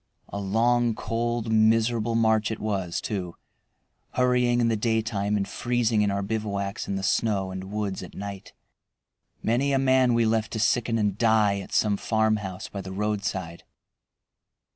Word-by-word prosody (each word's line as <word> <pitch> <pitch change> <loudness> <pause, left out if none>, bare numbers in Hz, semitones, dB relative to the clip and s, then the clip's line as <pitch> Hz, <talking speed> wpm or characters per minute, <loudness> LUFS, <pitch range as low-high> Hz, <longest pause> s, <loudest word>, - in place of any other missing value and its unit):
A 100 - -5
long, 115 +3 +2
cold, 115 0 -2
miserable 115 +1 +3
march 110 -2 +3
it 110 - -3
was 95 -5 -2
too, 90 -5 -4 0.8
hurrying 125 -1 +2
in 120 - +3
the 115 - +2
daytime 110 -2 0
and 100 - -1
freezing 120 -3 0
in 105 - +2
our 100 0 -1
bivouacs 100 -2 -3
in 100 - -2
the 95 - -3
snow 95 -2 +1
and 95 +1 -7
woods 105 -2 -3
at - - -10
night. 100 -1 -7 0.9
Many 130 +5 +1
a - - +3
man 130 -2 +3
we 115 -1 +3
left 110 0 0
to 110 - -2
sicken 115 +1 +1
and 105 -2 0
die 110 -3 +3
at 95 - -9
some 105 -2 +2
farmhouse 110 -4 -1
by 100 - -6
the 95 0 -8
roadside. 100 -4 -3
110 Hz, 160 wpm, -26 LUFS, 100-115 Hz, 0.9 s, miserable